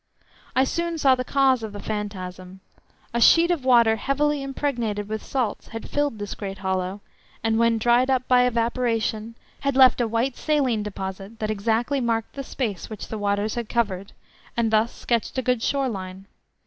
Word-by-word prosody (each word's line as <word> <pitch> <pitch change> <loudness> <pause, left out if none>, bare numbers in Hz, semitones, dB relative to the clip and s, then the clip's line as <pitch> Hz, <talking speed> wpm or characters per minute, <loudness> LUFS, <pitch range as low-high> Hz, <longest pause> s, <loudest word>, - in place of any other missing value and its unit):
I 260 - +5
soon 335 +4 -2
saw 275 -4 +5
the 255 0 -1
cause 265 -2 +3
of 220 -2 -6
the 205 - -7
phantasm. 190 -3 -6 0.5
A 235 - 0
sheet 340 +7 +6
of 330 -7 -1
water 235 -3 +5
heavily 290 +5 0
impregnated 240 -7 -2
with 215 0 -4
salts 245 -6 -2
had 225 -1 -7
filled 290 -5 0
this 205 -1 -5
great 195 -2 -6
hollow, 190 +1 -2 0.4
and 225 0 +1
when 230 -1 +3
dried 240 +3 +3
up 260 -1 +1
by 250 -1 +5
evaporation 230 -2 -1 0.2
had 280 -1 -1
left 260 -2 +6
a 235 - +1
white 230 +3 0
saline 270 -8 +1
deposit, 195 +1 -6
that 215 -1 -2
exactly 225 +6 0
marked 225 -2 -1
the 275 - -5
space 220 -9 -4
which 215 -2 -7
the 220 - -4
waters 205 +1 0
had 235 -2 -4
covered, 200 -5 -1 0.4
and 230 -2 +1
thus 220 +2 +3
sketched 235 +2 -2
a 260 - 0
good 250 -2 +1
shore 275 +2 +1
line. 190 -3 -6
230 Hz, 180 wpm, -24 LUFS, 210-260 Hz, 0.5 s, sheet